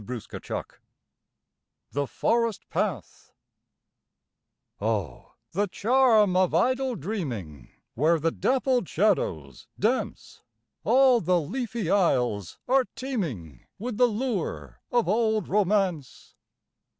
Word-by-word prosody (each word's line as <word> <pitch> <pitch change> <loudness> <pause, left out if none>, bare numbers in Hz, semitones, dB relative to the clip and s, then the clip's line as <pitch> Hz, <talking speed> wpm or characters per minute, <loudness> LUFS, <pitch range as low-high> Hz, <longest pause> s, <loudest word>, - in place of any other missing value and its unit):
85 120 +1 -7 1.1
THE 140 0 -1
FOREST 230 - 0
PATH - - -3 1.5
Oh, 105 -5 -3 0.2
the 205 +4 0
charm 220 -2 +3
of 185 -3 +2
idle 255 +7 +1
dreaming 125 - -5 0.2
Where 160 +6 +2
the 165 +2 +1
dappled 255 -3 +1
shadows 80 - 0
dance, - - -2 0.4
All 255 0 +5
the 180 -2 +2
leafy 225 - -3
aisles 125 - +1
are 260 0 +3
teeming 160 - -5
With 230 0 -5
the 250 0 +5
lure 205 - -3
of 240 -5 +2
old 220 0 +1
romance! 190 -7 0
195 Hz, 95 wpm, -26 LUFS, -, 1.5 s, All